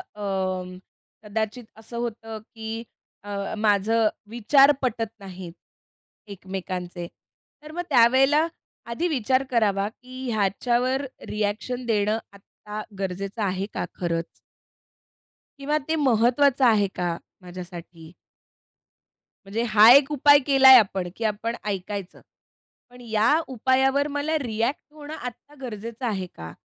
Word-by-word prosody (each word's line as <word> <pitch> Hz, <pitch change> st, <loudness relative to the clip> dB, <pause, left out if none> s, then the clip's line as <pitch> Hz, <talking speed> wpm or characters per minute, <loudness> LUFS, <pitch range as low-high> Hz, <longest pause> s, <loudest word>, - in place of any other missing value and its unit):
अं, 185 Hz, -3 st, -3 dB, 0.5 s
कदाचित 220 Hz, +3 st, -3 dB, 0.2 s
असं 235 Hz, +2 st, -9 dB
होतं 225 Hz, -2 st, -5 dB, 0.2 s
की 220 Hz, 0 st, -6 dB, 0.5 s
अ, 200 Hz, 0 st, -4 dB
माझं 215 Hz, +1 st, +2 dB, 0.2 s
विचार 270 Hz, +5 st, +5 dB
पटत 230 Hz, -3 st, -1 dB
नाहीत 185 Hz, -3 st, -9 dB, 0.8 s
एकमेकांचे. 180 Hz, -2 st, -6 dB, 0.6 s
तर 305 Hz, -, -10 dB
मग 350 Hz, +3 st, -3 dB
त्यावेळेला 270 Hz, +5 st, +5 dB, 0.4 s
आधी 280 Hz, +10 st, -1 dB
विचार 260 Hz, -3 st, +1 dB
करावा 205 Hz, -4 st, +2 dB
की 255 Hz, 0 st, -7 dB
ह्याच्यावर 240 Hz, +6 st, 0 dB, 0.2 s
रिएक्शन 215 Hz, +4 st, -3 dB
देणं 215 Hz, -1 st, +1 dB, 0.2 s
आत्ता 210 Hz, +1 st, -9 dB, 0.2 s
गरजेचं 195 Hz, +3 st, -4 dB
आहे 190 Hz, 0 st, -1 dB
का -, -, -2 dB
खरंच? 170 Hz, -2 st, -2 dB, 1.3 s
किंवा 295 Hz, +2 st, 0 dB
ते 320 Hz, -, +1 dB
महत्वाचं 260 Hz, +2 st, +3 dB
आहे 215 Hz, -4 st, +4 dB
का 175 Hz, -1 st, -1 dB, 0.3 s
माझ्यासाठी? 175 Hz, -2 st, -10 dB, 1.3 s
म्हणजे 215 Hz, +4 st, -2 dB
हा 215 Hz, +2 st, +7 dB
एक 280 Hz, +1 st, +5 dB
उपाय 290 Hz, 0 st, +6 dB
केलाय 265 Hz, -1 st, +9 dB
आपण 190 Hz, -4 st, -1 dB
की 230 Hz, -, -6 dB
आपण 220 Hz, +2 st, -2 dB
ऐकायचं, 200 Hz, -1 st, -5 dB, 0.7 s
पण 250 Hz, 0 st, -15 dB
या 225 Hz, +4 st, +2 dB
उपायावर 265 Hz, +3 st, +2 dB
मला 310 Hz, +2 st, 0 dB
रिएक्ट 235 Hz, +1 st, -2 dB
होणं 300 Hz, 0 st, -9 dB
आत्ता 250 Hz, +2 st, -9 dB
गरजेचं 230 Hz, +1 st, -6 dB
आहे 195 Hz, -5 st, -2 dB
का? 80 Hz, 0 st, -8 dB
220 Hz, 115 wpm, -24 LUFS, 195-260 Hz, 1.3 s, केलाय